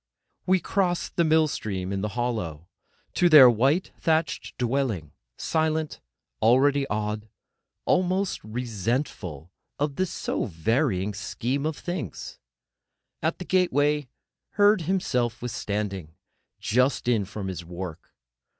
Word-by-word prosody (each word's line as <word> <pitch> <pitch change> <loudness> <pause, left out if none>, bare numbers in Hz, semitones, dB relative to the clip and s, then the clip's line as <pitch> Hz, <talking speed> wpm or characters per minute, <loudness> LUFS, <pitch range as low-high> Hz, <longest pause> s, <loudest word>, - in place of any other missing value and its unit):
We 185 0 +4
crossed 180 -2 -1
the 170 - +3
mill 160 0 +4
stream 95 -8 -3
in 95 - -2
the 105 - -1
hollow—to 110 - -2
their 150 -5 +10
white, 135 - +2
thatched 160 -1 0
dwelling; 120 - -1 0.3
silent, 160 -1 -1 0.4
already 135 +4 +4
awed, 105 -1 -3 0.6
almost 185 +1 +1
resentful 110 - -3 0.3
of 145 -1 -1
this 185 -1 0
so - - -2
varying 105 - 0
Scheme 125 +8 -2
of 155 - -3
Things. 175 - -5 0.8
At 160 +1 0
the 180 - -7
gateway 150 -6 +2 0.5
Herd 205 -1 +5
himself 125 - 0
was 125 0 -4
standing, 100 -7 -3 0.4
just 125 +3 +1
in 115 -4 +3
from 100 0 -6
his 90 -3 -5
work. 85 -1 -8
125 Hz, 115 wpm, -26 LUFS, 100-155 Hz, 0.8 s, their